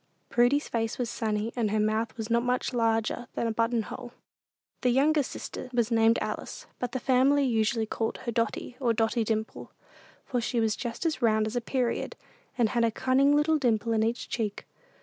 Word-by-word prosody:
Prudy's 245 +5 +3
face 225 -1 -2
was 245 -2 -2
sunny, 220 0 -2
and 230 -4 0
her 215 +1 0
mouth 215 +2 0
not 235 0 +2
much 250 +1 -1
larger 225 0 0
than - - -1
a 230 - 0
button 230 +1 +1
hole. 245 +2 -8 0.7
The 250 - +2
youngest 285 +3 +3
sister - - -7
was 240 -1 +1
named 225 0 +4
Alice, - - -5
but 250 -1 -3
the 260 - -1
family 265 +3 +3
usually 225 -2 +1
called 225 +1 -2
her 235 - -1
Dotty, 230 +2 -2
or 240 -4 +2
Dotty 225 +1 +1
Dimple, 220 0 -3 0.6
for 245 -2 -1
she 240 +1 -1
was 220 -2 +1
about 240 +7 -5
as 310 -5 0
round 220 -2 +3
as 220 +2 -4
a 245 - 0
period, 245 0 -1 0.4
and 235 -3 +3
had 235 0 +1
a 230 - +4
cunning 265 +5 +3
little 305 +1 +3
dimple 230 -3 +1
in 220 - +2
each 230 +2 -1
cheek. 215 -4 -3
235 Hz, 190 wpm, -28 LUFS, 225-250 Hz, 0.7 s, named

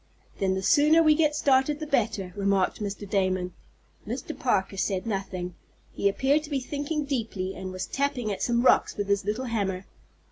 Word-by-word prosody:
"Then 190 -1 +1
the 190 - -3
sooner 305 - +5
we 310 -1 +6
get 300 -1 +2
started 280 0 +2
the 310 - -4
better," 215 -10 -1
remarked 200 0 +1
Mr. 205 0 -4
Damon. 185 -2 0 0.5
Mr. - - -4
Parker 190 0 0
said 190 -1 -1
nothing. 195 -4 -3 0.4
He 200 - +2
appeared 275 +9 +2
to 300 - -10
be 280 -3 0
thinking 290 +3 -3
deeply, 220 -8 -3
and 190 -1 -6
was 185 0 -4
tapping 270 -6 -1
at 195 - -4
some 240 0 +1
rocks - - +4
with 205 -1 -2
his 200 -1 +1
little 215 +5 -2
hammer. 195 -5 -2
210 Hz, 180 wpm, -27 LUFS, 190-280 Hz, 0.5 s, we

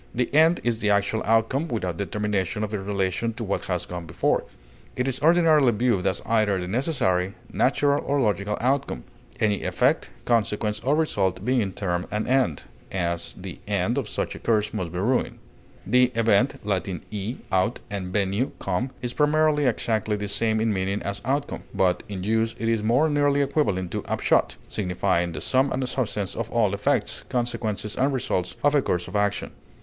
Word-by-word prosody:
The 125 +2 -1
end 160 +3 +5
is 120 -2 0
the 105 - 0
actual 100 +2 +2
outcome 115 +8 +2
without 90 - -2
determination 105 0 -1
of 105 0 -4
its 100 -2 -2
relation 100 +3 -1
to 115 - -5
what 100 -2 -2
has 90 -2 -2
gone 90 -2 -6
before; 75 - 0 0.5
it 125 +1 -1
is 135 0 -2
ordinarily 160 -5 +5
viewed 105 -4 +1
as - - -1
either 110 -4 +2
the 90 - -4
necessary, 100 - 0 0.2
natural, 145 +2 +2
or 145 0 0
logical 105 -3 0
outcome, 130 - 0 0.4
any 105 -2 +1
effect, 125 - +1 0.2
consequence, 105 -2 +1
or 135 +5 +1
result 100 - 0
being 120 -6 +1
termed 90 -2 -2
an 105 +1 -2
end; 130 - +1 0.3
as, 85 -2 -2
the - - -8
end 100 +3 0
of 135 -7 -2
such - - -2
a - - -9
course 105 -2 +1
must 90 -6 -3
be 90 - -5
ruin. 120 +8 0 0.5
The 125 +3 +4
event 115 +2 +3
(L. 100 -3 +1 0.3
e, 105 +3 -3 0.2
out, 95 +5 +1
and 100 -3 -3
venio, 100 +5 0
come) 95 +7 -2
is 125 0 -2
primarily 150 -1 +3
exactly 110 -2 0
the 105 0 -4
same 110 +2 +1
in 110 -1 +1
meaning 95 +1 -1
as 100 0 -4
outcome; 140 +3 -1
but 90 -1 +2
in 95 -3 -5
use 115 +2 +1
it 115 - -2
is 115 -2 +1
more 120 +8 +3
nearly 145 -1 +2
equivalent 100 - 0
to - - -3
upshot - - +1
signifying 90 -2 0
the - - -5
sum 135 +1 +2
and 130 0 -1
substance 105 -7 -2
of 115 0 -3
all 110 -4 +2
effects, 100 - 0
consequences, 110 -4 -2
and 135 +2 +2
results 90 -8 -1
of 145 0 +4
a 145 - +4
course 90 -7 -1
of - - -8
action. 105 -1 0
110 Hz, 180 wpm, -25 LUFS, 95-130 Hz, 0.5 s, end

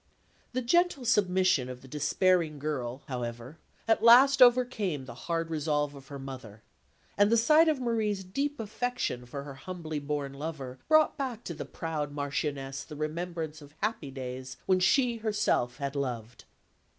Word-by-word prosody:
The 255 +1 -1
gentle 345 0 +2
submission 185 - +3
of 125 0 -8
the - - -12
despairing 155 +3 +1
girl, 135 -3 -4
however, 125 +2 -5 0.3
at 225 -1 +3
last 260 +4 +7
overcame 240 - +4
the 120 - -8 0.2
hard 165 -1 -1
resolve 150 -2 0
of 135 -1 -13
her 140 - -7
mother; 130 -6 -9 0.6
and 205 +1 +5
the 230 - +5
sight 305 +8 +5
of 305 -4 +1
Marie's 220 -5 0
deep 280 +10 -2
affection 225 - -3
for 140 +3 -6
her 140 -1 -8
humbly 160 0 -5
born 145 -1 -3
lover 140 -3 -6
brought 310 0 +4
back 250 -5 -3
to 170 - -5
the 155 - -6
proud 155 -3 -4
Marchioness 140 -1 -3
the 150 - -10
remembrance 160 0 -4
of 145 +1 -15
happy 215 -10 -1
days 130 -1 -7
when 185 -1 +3
she 240 +6 +3
herself 210 - 0
had 140 0 -4
loved. 120 -4 -4
155 Hz, 160 wpm, -29 LUFS, 135-220 Hz, 0.6 s, last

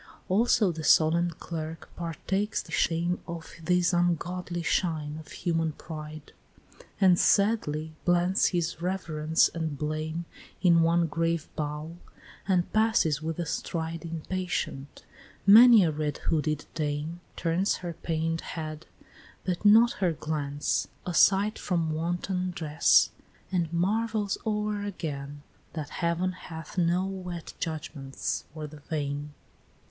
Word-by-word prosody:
VI. - - -21 0.2
Also 210 0 +3
the 160 -1 -6
solemn 165 +3 +4
clerk 160 -1 -6
partakes 190 +5 -2
the - - -14
shame 170 +2 +1
Of 170 -1 -7
this 180 +1 +2
ungodly 175 0 0
shine 155 -4 0
of 155 - -12
human 165 -2 -1
pride, 155 -1 -9 0.7
And 185 -3 +5
sadly 160 -7 +2
blends 175 +2 +3
his 170 -2 -1
reverence 165 -4 +1
and 160 -3 -4
blame 155 +3 -3 0.4
In 170 -2 +6
one 170 +1 +3
grave 165 0 -1
bow, 150 +2 -4 0.5
and 180 -3 +1
passes 215 -9 +3
with 160 0 -3
a 175 - -2
stride 165 +1 -3
Impatient: 165 -4 -4 0.4
many 225 +1 +9
a 165 - +2
red 150 -1 -2
hooded 155 -2 -1
dame 150 +1 -3 0.2
Turns 170 +4 +1
her 170 - -3
pain'd 165 0 -2
head, 155 -1 -6 0.6
but 180 0 -2
not 225 +3 +7
her 180 -3 +2
glance, 145 -2 -2 0.2
aside 195 +4 +3
From 170 -4 0
wanton 175 +3 -1
dress, 155 -2 +4 0.4
and 170 -4 0
marvels 210 +4 0
o'er 210 -1 -1
again, 145 -7 -5 0.3
That 155 -3 -5
heaven 170 +2 +1
hath 165 -3 -9
no 175 +1 +2
wet 180 -4 -6
judgments 145 -4 -4
for 155 0 -6
the 150 0 -10
vain. 145 -1 -4
165 Hz, 125 wpm, -28 LUFS, 155-180 Hz, 0.7 s, many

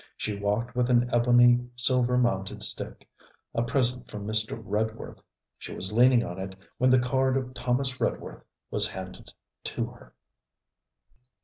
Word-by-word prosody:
She 105 - -3
walked 105 +4 -2
with 125 0 +1
an 120 0 +3
ebony 120 0 +5
silver 125 0 +2
mounted 95 -6 0
stick, - - -4 0.5
a 115 - 0
present 125 +1 0
from 105 -1 -7
Mr. 110 +1 -2
Redworth. 110 +1 -4 0.4
She - - -7
was 95 +3 -2
leaning 120 +1 +5
on 90 +2 -7
it 95 0 -6 0.2
when 130 - +4
the 130 - +6
card 130 +1 +1
of 130 -1 -4
Thomas 125 +1 0
Redworth - - -3 0.3
was - - +5
handed 95 -1 -8 0.4
to - - -1
her. - - -15
120 Hz, 145 wpm, -27 LUFS, 110-125 Hz, 0.5 s, the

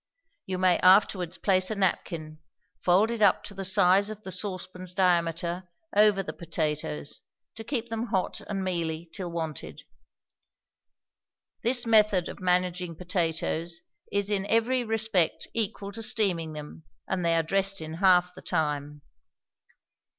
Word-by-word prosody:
You 185 -1 -2
may 185 -1 +3
afterwards 185 -2 +4
place 185 -2 +2
a 220 - -2
napkin, 165 -5 -2 0.4
folded 215 +6 +2
up 200 -3 +4
to 205 - -6
the 195 0 -6
size 190 +1 +4
of 215 0 -8
the 190 - -7
saucepan's 185 -1 -4
diameter, 175 -1 +1 0.3
over 205 -2 +5
the - - -6
potatoes, 150 - -3 0.3
to 225 - -8
keep 235 -1 -3
them 225 +1 -3
hot 190 -5 -1
and 195 -2 -2
mealy 170 -2 -3
till 180 -4 -5
wanted. 160 -3 -5 1.8
This 240 +1 +3
method 210 -5 +4
of - - -9
managing 180 -1 0
potatoes 170 -1 -2 0.3
is 200 0 0
in 200 -1 0
every 240 +3 +2
respect 220 -6 +1
equal 205 -2 -2
to 225 - -6
steaming 190 -8 +1
them, 150 +1 -9 0.2
and 185 -2 -2
they 170 0 +2
are 165 - +2
dressed 195 +3 0
in 160 0 -7
half 180 0 +3
the - - -12
time. 150 -3 -2
185 Hz, 140 wpm, -27 LUFS, 170-205 Hz, 1.8 s, over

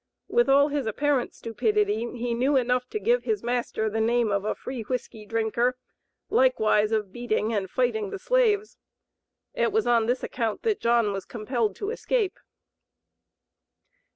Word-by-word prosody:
With 480 -7 +2
all 280 +2 +5
his 285 -4 -2
apparent 275 +3 0
stupidity 220 0 0
he 240 0 -2
knew 260 +5 +1
enough 250 0 +1
to 430 - -3
give 480 +4 +2
his 435 -2 -1
master 240 -2 -1
the 220 +1 -1
name 235 -1 +2
of 200 -1 0
a - - -1
"free 255 -2 -6
whiskey 220 -2 -5
drinker," 230 +3 0 0.5
likewise 220 - +3
of 210 -3 -1
"beating 230 -2 -1
and 195 -3 -1
fighting 220 -4 0
the - - -5
slaves." 430 -1 +1 0.7
It - - +1
was 440 +1 +1
on 230 -2 +3
this 250 +2 0
account 225 -4 -2
that 440 -3 0
John 230 -3 +2
was 195 -1 -4
compelled 225 -2 -2
to 410 +1 -4
escape. 455 -4 -1
240 Hz, 155 wpm, -26 LUFS, 220-285 Hz, 0.7 s, all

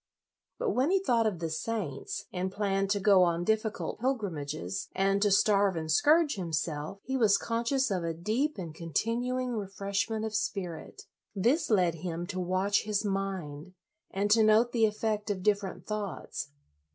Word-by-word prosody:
But 485 -4 0
when 265 0 +2
he 390 - +4
thought 240 - +2
of 200 -5 -2
the 165 -1 -3
saints, 190 0 -4
and 185 +1 -2
planned 195 -1 0
to 205 0 +1
go 195 -1 +5
on 170 -1 +2
difficult 220 +2 -1
pilgrim 220 - -1
ages, 140 - -4
and 195 +1 +2
to 205 - +4
starve 200 -1 +3
and 160 -1 -3
scourge 295 - +4
himself, 160 -1 -3
he 265 - -3
was 220 -6 +4
conscious 235 +2 0
of 185 -3 -1
a 165 - -1
deep 225 - -1
and 170 -5 -6
continuing 235 - -1
LOYOLA 220 -4 -2
57 - - -14 0.2
refreshment 210 +2 -1
of 220 - -4
spirit. 195 - -4 0.3
This 240 - +2
led 180 -6 +3
him 170 +1 -4
to 185 - -3
watch 185 +3 +1
his 210 0 -1
mind, 185 -5 -4 0.3
and 200 +2 -1
to 225 +1 +6
note 220 +2 +4
the 225 -2 +3
effect 215 0 -2
of 190 -3 -2
different 200 -2 0
thoughts. 205 -8 -4
200 Hz, 175 wpm, -29 LUFS, 180-225 Hz, 0.3 s, to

